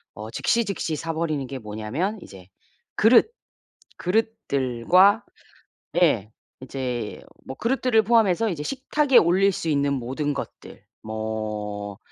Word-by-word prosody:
어 105 Hz, +1 st, -7 dB
즉시즉시 200 Hz, -, 0 dB
사 165 Hz, +2 st, -4 dB
버리는 155 Hz, -4 st, -2 dB
게 135 Hz, +1 st, -6 dB
뭐냐면 110 Hz, -, -3 dB
이제 95 Hz, -2 st, -13 dB, 0.5 s
그릇, 235 Hz, -, +5 dB, 0.7 s
그릇들과 185 Hz, -, +2 dB, 0.8 s
예 110 Hz, -, +2 dB, 0.3 s
이제 125 Hz, -4 st, -4 dB, 0.2 s
뭐 130 Hz, -, -7 dB
그릇들을 245 Hz, -2 st, +2 dB
포함해서 225 Hz, -1 st, +3 dB
이제 165 Hz, -6 st, -4 dB
식탁에 275 Hz, -, +1 dB
올릴 190 Hz, +4 st, +4 dB
수 165 Hz, -, -3 dB
있는 140 Hz, -1 st, +1 dB
모든 135 Hz, +3 st, -2 dB
것들 140 Hz, -, -8 dB, 0.2 s
뭐 105 Hz, -2 st, -4 dB
150 Hz, 240 characters per minute, -24 LUFS, -, 0.8 s, 그릇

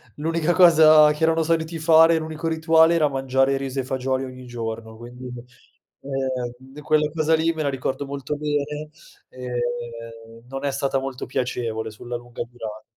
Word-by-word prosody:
l'unica 165 Hz, +2 st, 0 dB
cosa 155 Hz, -4 st, +7 dB
che 150 Hz, +2 st, -3 dB
erano 165 Hz, 0 st, +3 dB
soliti 165 Hz, 0 st, -1 dB
fare, 165 Hz, +1 st, +6 dB
l'unico 160 Hz, +1 st, -4 dB
rituale, 160 Hz, 0 st, +4 dB
era 155 Hz, -3 st, +3 dB
mangiare 135 Hz, 0 st, +1 dB
riso 135 Hz, 0 st, -3 dB
e -, -, -7 dB
fagioli 130 Hz, 0 st, -2 dB
ogni 130 Hz, -1 st, -9 dB
giorno, 115 Hz, -2 st, -6 dB
quindi, 120 Hz, +2 st, -11 dB, 0.8 s
ehm, 130 Hz, 0 st, -4 dB
quella 150 Hz, 0 st, +2 dB
cosa 160 Hz, 0 st, +2 dB
lì 160 Hz, +1 st, +1 dB
me 160 Hz, -1 st, -3 dB
la 140 Hz, -, 0 dB
ricordo 135 Hz, +1 st, -3 dB
molto 140 Hz, +1 st, -5 dB
bene, 150 Hz, 0 st, -3 dB, 0.4 s
ehm, 120 Hz, -2 st, -6 dB
non 135 Hz, +2 st, -6 dB
è 140 Hz, -, 0 dB
stata 135 Hz, 0 st, -1 dB
molto 135 Hz, -1 st, -5 dB
piacevole 115 Hz, -3 st, -3 dB
sulla 120 Hz, +3 st, -7 dB
lunga 120 Hz, 0 st, -8 dB
durat 110 Hz, -3 st, -8 dB
135 Hz, 155 wpm, -23 LUFS, 125-155 Hz, 0.8 s, cosa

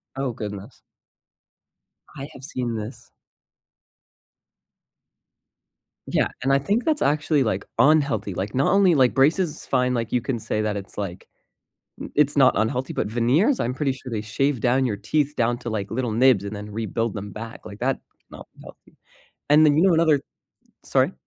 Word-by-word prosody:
Oh 135 Hz, -2 st, -2 dB
goodness. 105 Hz, -2 st, -8 dB, 1.4 s
I 140 Hz, +1 st, -7 dB
have 135 Hz, -, -13 dB
seen 125 Hz, -5 st, -3 dB
this. 110 Hz, +4 st, -7 dB, 3.0 s
Yeah, -, -, +1 dB, 0.2 s
and 135 Hz, -, +2 dB
I 135 Hz, -, +4 dB
think 205 Hz, -, 0 dB
that's 310 Hz, -2 st, 0 dB
actually, 150 Hz, -1 st, +2 dB
like, 100 Hz, -3 st, -2 dB
unhealthy, 140 Hz, -10 st, +3 dB
like, 95 Hz, +4 st, -4 dB
not 135 Hz, +2 st, +2 dB
only, 195 Hz, -3 st, +5 dB
like, 130 Hz, -4 st, +3 dB
braces 155 Hz, +4 st, +1 dB
fine, 125 Hz, 0 st, +1 dB
like, 115 Hz, -2 st, -2 dB
you 125 Hz, -, +2 dB
can 130 Hz, -1 st, -2 dB
say 110 Hz, 0 st, -2 dB
that 105 Hz, -1 st, -1 dB
it's 100 Hz, -1 st, -8 dB
like, 95 Hz, -3 st, -5 dB, 0.8 s
i -, -, -6 dB
it's 145 Hz, 0 st, +2 dB
not 130 Hz, -2 st, +6 dB
unhealthy, 125 Hz, +4 st, -1 dB
but -, -, -2 dB
veneers, 125 Hz, -, +2 dB
I'm 120 Hz, -, 0 dB
pretty 135 Hz, 0 st, -1 dB
sure 130 Hz, -1 st, -9 dB
they 105 Hz, -, -1 dB
shave 125 Hz, +4 st, -1 dB
down 130 Hz, +2 st, +2 dB
your 105 Hz, -5 st, -1 dB
teeth 145 Hz, +8 st, -1 dB
down 120 Hz, +1 st, +1 dB
to, 120 Hz, -, -6 dB
like, 100 Hz, -3 st, -3 dB
little 120 Hz, 0 st, -2 dB
nibs 120 Hz, -4 st, +4 dB
and 100 Hz, +1 st, -5 dB
then 105 Hz, +1 st, -7 dB
rebuild 115 Hz, +1 st, -2 dB
them 105 Hz, 0 st, -6 dB
back, 115 Hz, +4 st, -9 dB
like, 100 Hz, -, -10 dB
that 135 Hz, +1 st, +1 dB
is -, -, -38 dB
not -, -, -11 dB, 0.2 s
healthy, -, -, -16 dB, 0.5 s
and 155 Hz, +1 st, +7 dB
then 145 Hz, 0 st, +4 dB
you 165 Hz, -, +4 dB
know 185 Hz, -, +5 dB
another 160 Hz, -4 st, +3 dB, 0.6 s
sorry? -, -, +1 dB
125 Hz, 175 wpm, -23 LUFS, 110-145 Hz, 3.0 s, and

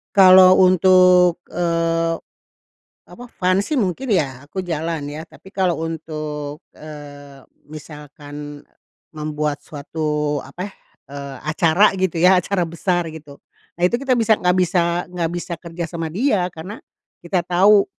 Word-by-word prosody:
Kalau 185 Hz, -1 st, +8 dB
untuk, 180 Hz, -1 st, +5 dB
eee, 165 Hz, -1 st, -1 dB, 0.9 s
apa, 245 Hz, -, -12 dB
fun 185 Hz, +1 st, +1 dB
sih 295 Hz, +7 st, -2 dB
mungkin 225 Hz, +4 st, -2 dB
ya 140 Hz, -, 0 dB
aku 150 Hz, +7 st, -10 dB
jalan 165 Hz, -3 st, -3 dB
ya. 150 Hz, +2 st, -6 dB
Tapi 165 Hz, +3 st, -16 dB
kalau 185 Hz, -3 st, 0 dB
untuk, 155 Hz, -1 st, -6 dB
eee, 145 Hz, -2 st, -12 dB, 0.2 s
misalkan 145 Hz, -1 st, -10 dB, 0.5 s
membuat 150 Hz, -1 st, -3 dB
suatu 150 Hz, -1 st, -3 dB
apa, 180 Hz, +7 st, -7 dB, 0.4 s
eee, 140 Hz, -1 st, -8 dB
acara 165 Hz, +6 st, +3 dB
gitu 185 Hz, -3 st, -1 dB
ya, 180 Hz, +2 st, +5 dB
acara 180 Hz, -1 st, -1 dB
besar 175 Hz, +1 st, -1 dB
gitu. 145 Hz, -3 st, -12 dB, 0.4 s
Nah -, -, -7 dB
itu 240 Hz, +8 st, -1 dB
kita 260 Hz, -3 st, +1 dB
bisa 225 Hz, -1 st, +4 dB
nggak 180 Hz, -3 st, +1 dB
bisa 175 Hz, -1 st, +1 dB
nggak 175 Hz, -2 st, -3 dB
bisa 175 Hz, 0 st, -5 dB
kerja 170 Hz, 0 st, -6 dB
sama 165 Hz, -1 st, -5 dB
dia 195 Hz, -, 0 dB
karena 180 Hz, +7 st, -9 dB, 0.4 s
kita 175 Hz, 0 st, -1 dB
tahu 195 Hz, +3 st, +4 dB
170 Hz, 135 wpm, -20 LUFS, 150-185 Hz, 0.9 s, Kalau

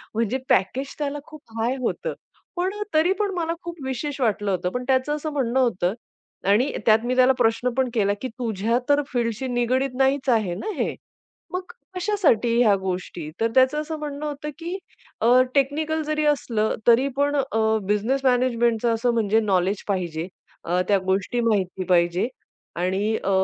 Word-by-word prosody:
म्हणजे 230 Hz, +3 st, 0 dB
पॅकेज 250 Hz, +9 st, +1 dB
त्याला 290 Hz, 0 st, -2 dB
खूप 310 Hz, -2 st, -12 dB, 0.2 s
हाय 240 Hz, +4 st, +1 dB
होतं. 485 Hz, -, -2 dB, 0.4 s
पण 370 Hz, +3 st, 0 dB
अ, -, -, 0 dB
तरी 340 Hz, +5 st, +4 dB
पण 405 Hz, -1 st, 0 dB
मला 335 Hz, -1 st, -1 dB
खूप 345 Hz, 0 st, -6 dB
विशेष 270 Hz, +2 st, -3 dB
वाटलं 205 Hz, -3 st, +1 dB
होतं 180 Hz, -1 st, -1 dB
पण 250 Hz, -, -3 dB
त्याचं 260 Hz, +3 st, +2 dB
असं 305 Hz, +1 st, -4 dB
म्हणणं 265 Hz, -2 st, 0 dB
होतं 195 Hz, -7 st, +1 dB, 0.6 s
आणि 230 Hz, +7 st, +3 dB, 0.2 s
त्यात 220 Hz, +2 st, +5 dB
मी 255 Hz, -, 0 dB
त्याला 255 Hz, +1 st, +6 dB
प्रश्न 230 Hz, +1 st, +2 dB
पण 260 Hz, -1 st, +2 dB
केला, 205 Hz, -3 st, +2 dB
की 260 Hz, -, -2 dB
"तुझ्या 230 Hz, 0 st, 0 dB
तर 290 Hz, 0 st, +4 dB
फील्डशी 235 Hz, +1 st, -1 dB
निगडीत 255 Hz, +2 st, 0 dB
नाहीच 270 Hz, 0 st, +1 dB
आहे 180 Hz, -5 st, -3 dB
ना 435 Hz, -, -1 dB
हे. -, -, -1 dB, 0.6 s
मग 365 Hz, -, -1 dB, 0.3 s
कशासाठी 360 Hz, -, +2 dB
ह्या 210 Hz, -3 st, +5 dB
गोष्टी?" 180 Hz, -4 st, -4 dB
तर 230 Hz, -, +2 dB
त्याचं 265 Hz, +4 st, +4 dB
असं 310 Hz, 0 st, -5 dB
म्हणणं 295 Hz, 0 st, -5 dB
होतं, 300 Hz, 0 st, -4 dB
की 345 Hz, +3 st, -4 dB, 0.4 s
अ, 245 Hz, +3 st, +6 dB
"टेक्निकल 305 Hz, +3 st, +1 dB
जरी 305 Hz, 0 st, 0 dB
असलं 235 Hz, -7 st, +1 dB
तरी 240 Hz, +3 st, +5 dB
पण 285 Hz, +1 st, +2 dB
अ, 270 Hz, -5 st, 0 dB, 0.3 s
बिझनेस 215 Hz, +7 st, +1 dB
मॅनेजमेंटचं 240 Hz, -2 st, +2 dB
असं 235 Hz, +1 st, +1 dB
म्हणजे 220 Hz, -1 st, +2 dB
नॉलेज 195 Hz, -1 st, +1 dB
पाहिजे. 175 Hz, -4 st, -2 dB, 0.4 s
अ, 180 Hz, +2 st, +1 dB
त्या 200 Hz, -, +5 dB
गोष्टी 195 Hz, +6 st, 0 dB
माहिती 195 Hz, -5 st, 0 dB
पाहिजे 175 Hz, +4 st, +3 dB, 0.5 s
आणि 195 Hz, +4 st, 0 dB
अ, -, -, -1 dB
245 Hz, 170 wpm, -24 LUFS, 210-285 Hz, 0.6 s, त्याला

